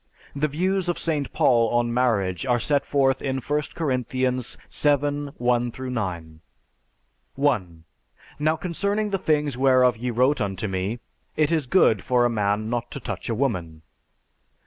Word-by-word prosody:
The 145 +2 +1
views 185 +5 -1
of 175 - 0
St. 150 -4 -1
Paul 120 -7 +3
on 120 0 +1
marriage 105 -8 +1
are 125 -2 +1
set 140 +3 0
forth 135 -2 +2
in 135 -1 -2
I 145 +3 -1
Corinthians 130 -4 -1
VII 145 0 +1
1 120 -1 +1
9: 90 -11 -4 0.9
1. 100 - 0 0.6
Now 155 +2 +2
concerning 200 +5 -2
the 195 - 0
things 150 -6 0
whereof 130 -2 +4
ye 125 +2 -3
wrote 130 +5 +2
unto 100 0 -2
me: 95 +4 -2 0.4
It 155 0 +2
is 155 -5 0
good 115 - +3
for 125 -1 +2
a 120 - +2
man 105 -1 0
not 120 0 -2
to - - -7
touch - - -5
a 115 - 0
woman. 90 - -2
130 Hz, 150 wpm, -24 LUFS, 115-145 Hz, 0.9 s, whereof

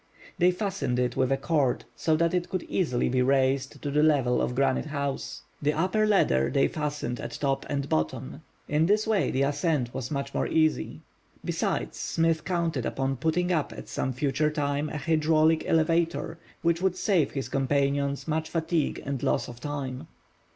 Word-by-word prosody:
They 180 - +5
fastened 180 - -1
it 125 -1 0
with 130 0 +1
a 135 - +3
cord 140 -2 0
so 160 - +1
that 170 +2 +1
it 180 -1 0
could 185 -2 -2
easily 150 -10 0
be 125 0 +1
raised 135 0 +1
to 145 - -2
the 150 +1 +3
level 140 -6 +3
of 125 - -1
Granite 135 +2 +1
House. 140 -2 -4 0.2
The 150 +1 +2
upper 185 +7 +1
ladder 65 - +3
they 135 - +3
fastened 150 -6 -3
at - - -6
top 135 -1 -1
and 140 -1 -1
bottom. 80 - -2 0.3
In 155 +2 +2
this 210 +2 +3
way 220 -3 +2
the 135 - +1
ascent 145 -3 0
was 130 -2 -4
much 140 -1 -3
more - - 0
easy. 155 -1 +1 0.4
Besides, - - -2
Smith 165 -1 +1
counted 170 -8 -1
upon 135 0 -1
putting 160 +6 0
up 155 -4 0
at - - -9
some 130 - -2
future 140 +3 0
time 145 -1 -1
a - - -4
hydraulic 155 +1 +2
elevator, 165 +1 +1 0.2
which 170 0 +2
would 190 -1 +1
save 185 -6 +2
his 135 -2 -3
companions 140 +1 0
much 160 0 -1
fatigue 165 -1 -1
and 140 -2 -3
loss - - 0
of 120 -1 -10
time. 140 0 -5
150 Hz, 180 wpm, -27 LUFS, 135-165 Hz, 0.4 s, They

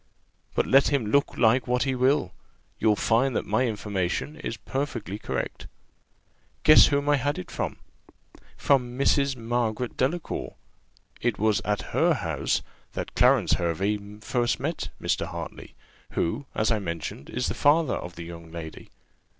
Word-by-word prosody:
But - - +2
let 135 +1 +5
him 140 -6 +1
look 140 0 +2
like 115 +1 +3
what 125 0 +2
he 135 -1 0
will, 130 +3 +2 0.5
you'll 105 -1 +4
find 120 +4 +2
that - - 0
my 130 - +1
information 100 - -2
is 115 - -5
perfectly 120 -7 -4
correct. - - -4 1.0
Guess 155 - +9
whom 145 0 0
I 145 0 +4
had 145 +2 -1
it 90 - -7
from - - -3 0.8
from 125 -3 +1
Mrs. 140 0 +2
Margaret 120 0 -2
Delacour: 155 +6 -2 0.7
it 120 -2 0
was 105 -2 +2
at 105 -1 -2
her - - +3
house - - -1 0.3
that - - -5
Clarence - - +4
Hervey 95 +5 0 0.2
first 120 +1 0
met 155 +6 -3
Mr. - - -1
Hartley, - - -8 0.4
who, 130 +11 -1
as 110 +2 +2
I 110 - +2
mentioned, 85 -6 -5
is 125 +1 -2
the - - -1
father 150 -1 +3
of 90 0 -5
the 85 - -7
young 85 -1 -9
lady. 80 -2 -8
120 Hz, 150 wpm, -26 LUFS, 105-140 Hz, 1.0 s, Guess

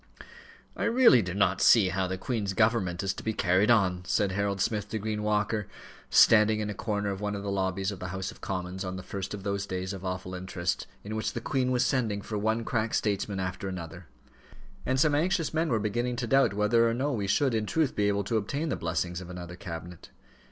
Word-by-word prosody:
"I - - -2
really 235 - +6
do 90 -2 -4
not 100 -2 +2
see 105 -6 +6
how 95 +1 -1
the 95 +1 -3
Queen's 100 -1 -2
government 100 -4 +1
is 95 - 0
to - - -9
be 110 - -1
carried 95 +1 +2
on," 95 -6 +3
said 100 +2 +1
Harold 100 0 -1
Smith 105 +1 -1
to 110 - -2
Green 105 0 -3
Walker, 105 0 0 0.4
standing 110 0 +6
in 105 -1 -2
a - - -4
corner 105 -1 -2
of 95 0 -5
one 105 0 -2
of 100 - -5
the 100 - -2
lobbies 95 0 -1
of 100 - -8
the 90 - -5
House 95 +1 -4
of - - -17
Commons 95 0 -4
on 95 0 -4
the 95 - -7
first 100 +1 -5
of 100 - -9
those 100 0 -2
days 95 +1 -3
of 95 -1 -8
awful 90 0 -4
interest, 90 -1 -3 0.2
in 105 +2 -5
which 110 - -2
the - - -3
Queen 130 +2 0
was 125 -1 +2
sending 110 -6 0
for 110 - -5
one 110 +2 0
crack 110 -1 -1
statesman 100 -1 -1
after 95 +2 -3
another; 85 -1 -7 0.8
and 130 +1 +1
some 150 +1 +4
anxious 165 +2 +1
men 160 +1 +1
were 115 - +2
beginning 120 +4 -1
to 120 0 -2
doubt 135 -3 +3
whether 115 +3 +3
or 115 - -1
no 140 +4 0
we 105 -6 -2
should, 135 +5 +2
in 110 -1 -1
truth, 155 +1 0
be 105 -1 +2
able 100 0 +1
to 110 +4 0
obtain 140 +10 -2
the - - 0
blessing 85 +1 -2
of 90 - -9
another 90 -1 -7
cabinet. 85 -1 -8
100 Hz, 230 wpm, -28 LUFS, 95-115 Hz, 0.8 s, really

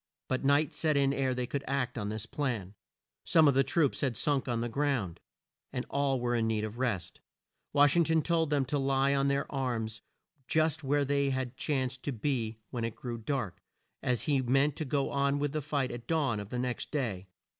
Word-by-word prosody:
But 130 - -1
night 140 +2 +3
set 155 -3 +1
in 140 -1 +3
ere 130 -2 0
they 125 0 -1
could 140 +3 -3
act 130 -2 -1
on 105 -3 -3
this 110 0 -4
plan. 115 -9 -3 0.5
Some 160 -2 +5
of 140 - +5
the 135 +1 +4
troops 150 -1 +1
had 130 -6 0
sunk 140 0 +1
on 120 -2 0
the 120 - -1
ground, 120 - -1 0.5
and 125 - -3
all 140 -2 +1
were 120 0 0
in 115 -1 +1
need 110 -1 0
of 110 +2 -5
rest. 115 -9 -2 0.5
Wash 145 +1 +5
ing 170 -1 +5
ton 160 -1 +2
told 165 -3 +1
them 145 -3 +2
to 145 +3 -1
lie 135 0 +2
on 140 0 +2
their 140 0 +1
arms 120 -5 -2 0.5
just 160 0 +1
where 145 +1 +2
they 140 0 +1 0.2
chanced 130 -3 -1
to 145 - -2
be 115 -3 -1
when 120 -2 -3
it 115 -1 -2
grew 120 -2 -5
dark, 115 -5 -3 0.4
as 125 -2 0
he 140 -3 +2
meant 135 +3 +2
to 160 - -2
go 140 0 0
on 140 0 +1
with 145 0 0
the 155 +1 -2
fight 140 -2 -1
at 120 0 -8
dawn 140 -10 +1
of 100 -1 -7
the 125 - -3
next 125 0 -2
day. 110 -10 -2
135 Hz, 210 wpm, -31 LUFS, 120-145 Hz, 0.5 s, Some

